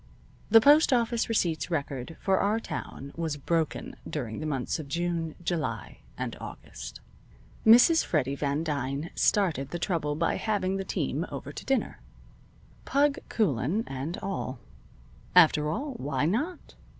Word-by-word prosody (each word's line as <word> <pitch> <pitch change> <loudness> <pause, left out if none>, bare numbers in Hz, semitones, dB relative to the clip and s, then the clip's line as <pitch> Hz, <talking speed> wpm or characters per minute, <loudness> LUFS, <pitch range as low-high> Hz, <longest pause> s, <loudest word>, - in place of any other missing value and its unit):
The 225 +1 +9
postoffice 245 -4 +4
receipts 175 -8 0
record 140 -2 -3
for 190 -1 +2
our 210 +3 +2
town 140 - -6
was 160 -3 -2
broken 160 +2 -1
during 120 -8 -4
the 155 - -3
months 135 +1 -2
of 155 - -6
June, 170 +1 -2
July, 155 - -3 0.2
and - - -3
August. - - -9 0.7
Mrs. 245 +9 +7
Freddy 140 -4 0
Van 140 +2 -1
Dyne 145 0 -2
started 165 -10 +1
the 175 - -3
trouble 160 -4 -1
by 165 +2 0
having 195 -3 0
the 195 - -2
team 65 - -2
over - - -6
to - - -8
dinner, - - -1 0.8
"Pug" 280 +1 +2
Coulan 185 - +1
and 135 +6 -4
all. 165 -9 -3 0.8
After 155 -4 +6
all, 270 - -3
why 140 - -1
not? 280 - -2
165 Hz, 140 wpm, -28 LUFS, 140-205 Hz, 0.8 s, The